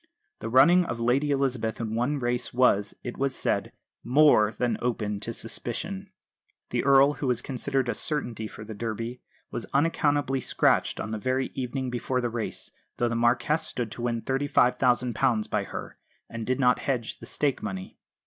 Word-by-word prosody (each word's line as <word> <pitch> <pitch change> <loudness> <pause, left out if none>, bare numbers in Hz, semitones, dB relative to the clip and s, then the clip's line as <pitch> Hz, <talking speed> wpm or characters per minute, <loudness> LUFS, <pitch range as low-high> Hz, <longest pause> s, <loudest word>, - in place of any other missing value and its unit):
The 115 - -4
running 145 +9 +6
of 120 -7 -4
Lady 125 +5 +2
Elizabeth 130 -6 0
in 110 -2 -3
one 125 +6 0
race 120 -1 -1
was, 105 -5 +2
it 120 - -6
was 135 -1 0
said, - - -1 0.3
more 125 -5 +5
than 120 +3 -1
open 110 -4 -1
to 115 - -3
suspicion. 165 - -4 0.6
The - - 0
Earl, 140 +1 +6
who 145 - -4
was 125 -1 0
considered 135 0 -1
a 120 - 0
certainty 120 -8 -2
for 105 - -10
the 110 +1 -7
Derby, 115 +3 -4 0.3
was 115 - -5
unaccountably 145 -3 +2
scratched - - +2
on 110 - -4
the 110 - -3
very 130 +3 -1
evening 130 0 -3
before 125 +1 -1
the 120 -1 -1
race, 115 -1 -4 0.3
though 120 - +1
the 115 - -2
Marquess 120 +6 +2
stood 120 -3 -4
to 120 - -7
win 120 -1 -1
£35,000 125 -4 +2
by - - 0
her, - - -7 0.3
and 115 -1 -6
did 130 +1 0
not 125 -2 +4
hedge 125 -5 -2
the 115 - -11
stake 140 +1 0
money. 95 -3 -6
125 Hz, 175 wpm, -27 LUFS, 115-135 Hz, 0.6 s, running